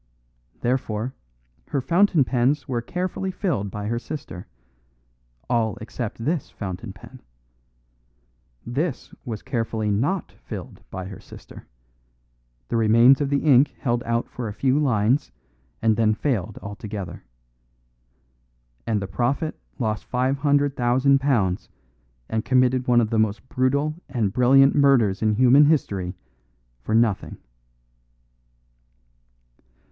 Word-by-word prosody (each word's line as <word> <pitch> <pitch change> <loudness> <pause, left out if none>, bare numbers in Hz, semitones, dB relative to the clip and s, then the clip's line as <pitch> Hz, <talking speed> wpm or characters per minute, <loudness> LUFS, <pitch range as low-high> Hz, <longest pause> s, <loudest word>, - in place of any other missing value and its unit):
Therefore, 120 -1 -1 0.5
her 140 - -1
fountain 170 +2 +3
pens 130 +4 0
were 120 -3 -1
carefully 180 +7 -3
filled 170 - -2
by 105 0 -6
her 115 +2 -1
sister 130 - -8 1.0
all 115 -3 +1
except 115 +1 -6
this 155 -1 -1
fountain 95 -1 -6
pen. 125 +7 -14 1.4
This 135 +3 -3
was 110 -4 -5
carefully 115 -4 -2
not 140 - -1
filled - - -9
by 95 0 -6
her 95 0 -9
sister; - - -13 1.0
the - - -1
remains 115 +5 +5
of 140 - 0
the 140 -1 0
ink 140 -2 +4
held 120 -3 -1
out 115 0 -1
for 120 -2 -6
a 105 - -5
few 135 +5 +1
lines 125 - +1 0.5
and 110 -1 +4
then 110 -1 +2
failed 110 -6 -2
altogether. 100 -3 -7 1.6
And 105 -3 0
the - - -4
prophet 135 +9 -1 0.2
lost 110 -5 -2
five 130 +2 0
hundred 145 -1 +2
thousand 130 +3 +3
pounds 110 -10 0 0.6
and 110 0 -2
committed 130 0 +2
one 120 -1 +5
of 110 0 -1
the 115 - +2
most 110 +3 0
brutal 140 +4 +1 0.2
and 110 -6 -1
brilliant 135 +2 +5
murders 130 -9 +3
in 110 -1 +2
human 130 +5 +6
history 100 - 0 0.7
for 110 - -1
nothing." 115 -3 +1
120 Hz, 120 wpm, -23 LUFS, 110-140 Hz, 1.6 s, human